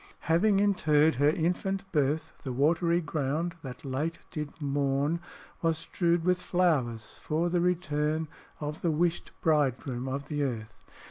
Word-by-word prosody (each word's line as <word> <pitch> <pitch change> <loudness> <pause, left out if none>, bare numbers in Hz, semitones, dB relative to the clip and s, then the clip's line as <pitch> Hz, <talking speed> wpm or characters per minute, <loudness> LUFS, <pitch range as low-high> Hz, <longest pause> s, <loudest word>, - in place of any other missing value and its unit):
"Having 195 +5 +3
interr'd 160 -6 +4
her 145 +2 +5
infant 180 +5 0
birth, 150 0 +1
The 130 - -4
watery 170 +6 +2
ground 155 +2 -1
that 130 0 -8
late 145 +5 -2
did 150 0 -5
mourn 140 +2 0 0.4
Was 165 -1 +2
strew'd 170 0 0
with 180 0 +2
flowers 145 -11 0
for 165 +3 0
the 175 -1 +2
return 160 -3 0 0.3
Of 150 +1 -4
the 170 - +1
wish'd 170 +2 0
bridegroom 135 -4 +1
of 140 +2 -3
the 150 -1 -2
earth. 115 -6 -2
155 Hz, 140 wpm, -29 LUFS, 140-170 Hz, 0.4 s, her